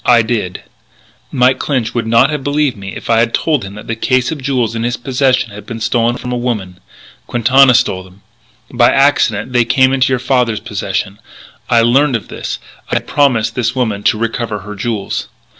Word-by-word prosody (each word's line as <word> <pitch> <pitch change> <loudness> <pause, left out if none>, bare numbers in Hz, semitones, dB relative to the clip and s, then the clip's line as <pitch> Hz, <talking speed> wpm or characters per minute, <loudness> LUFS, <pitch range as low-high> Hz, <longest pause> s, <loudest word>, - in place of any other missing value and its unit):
I 120 -2 +5
did. 110 -6 -2
But - - -9 0.7
Mike 130 +1 +3
Clinch 125 -5 -1
would 115 -2 -2
not 115 +5 +4
have 150 -3 -3
believed 145 -2 0
me 95 -1 -8
if - - -8
I 115 -1 +3
had 115 0 +2
told 150 -6 0
him 100 +1 -8
that 105 - -10
the 115 - -3
case 130 +3 +1
of 155 -4 -5
jewels 130 -4 -1
in 115 - -3
his 120 +1 -1
possession 130 -2 0
had 105 +1 -11
been 115 -1 -6
stolen 120 +1 0
from 125 - -6
a 125 - -1
woman.... 105 -7 -3 0.5
Quintana 130 +2 +4
stole 115 -7 +1
them. 95 +2 -18 0.5
By 120 -1 +4
accident 125 -5 +2
they 120 -1 +4
came 130 +2 +3
into 130 -1 +2
your 130 - +2
father's 125 -3 0
possession. 100 0 -4 0.5
I 115 - +4
learned 135 +3 +3
of 115 - -4
this. - - -5 0.3
I - - -1
had - - -1
promised 130 -6 +1
this 125 0 -1
woman 110 -6 -1
to - - +3
recover 115 -2 -3
her 105 +2 -8
jewels. 105 0 -3
120 Hz, 205 wpm, -15 LUFS, 110-130 Hz, 0.7 s, I